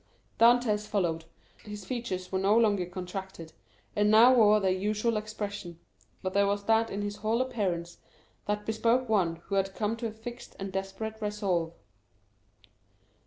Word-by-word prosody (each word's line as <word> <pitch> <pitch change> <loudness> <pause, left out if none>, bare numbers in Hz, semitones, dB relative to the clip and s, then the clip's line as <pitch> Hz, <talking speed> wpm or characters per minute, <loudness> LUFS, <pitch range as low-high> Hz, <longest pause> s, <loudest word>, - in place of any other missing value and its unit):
Dantès 230 -3 +4
followed 170 -6 -1 0.4
him; - - -13
his 205 -2 -7
features 190 -6 -4
were 190 - 0
no 200 +3 +3
longer 205 -6 +2
contracted, 180 -2 -7 0.4
and 210 0 +3
now 230 +4 +7
wore 215 -3 +6
their 190 -2 +1
usual 210 +4 0
expression, 205 -5 -5 0.4
but 185 0 -2
there 200 0 +3
was 200 0 -1
that 225 +1 +2
in 205 +1 -3
his 205 0 -4
whole 220 +2 0
appearance 190 -10 -2 0.5
that 210 0 -1
bespoke 230 +3 +1
one 190 -7 +2
who - - -7
had 195 0 0
come 215 +1 -1
to 230 0 -3
a - - -6
fixed 235 +3 -9
and 195 0 -5
desperate 195 +3 -4
resolve. 195 -6 -1
210 Hz, 160 wpm, -29 LUFS, 190-220 Hz, 0.5 s, now